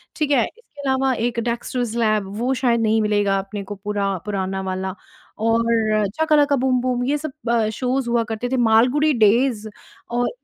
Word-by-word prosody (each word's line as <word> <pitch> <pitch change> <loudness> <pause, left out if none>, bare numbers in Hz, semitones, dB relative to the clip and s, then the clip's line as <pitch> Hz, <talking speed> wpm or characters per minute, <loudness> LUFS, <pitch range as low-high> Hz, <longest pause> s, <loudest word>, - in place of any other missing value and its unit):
ठीक 300 -2 -1
है? 260 -5 +4
इसके 445 -11 -13
अलावा 265 0 +2
एक 235 -1 -1
डेक्सटर्स 235 0 -2
लैब 215 -4 +1
वो 250 +4 0
शायद 245 -3 +1
नहीं 220 0 +2
मिलेगा 205 -2 +1
अपने 200 +1 -6
को 205 +1 -7
पूरा 200 -1 -2
पुराना 195 -2 -2
वाला 190 0 -3 0.4
और 225 -1 +1 0.2
शकालका 295 -2 +4
बूम-बूम 255 -1 0
ये 285 +3 +1
सब 305 0 -5 0.2
अ, 230 -2 +2
शोज़ 255 +2 -2
हुआ 235 -1 +2
करते 225 +1 -4
थे, 260 - 0
मालगुड़ी 250 +6 +3
डेज़ 225 0 +2 0.4
और 240 +1 0
235 Hz, 165 wpm, -21 LUFS, 215-255 Hz, 0.4 s, है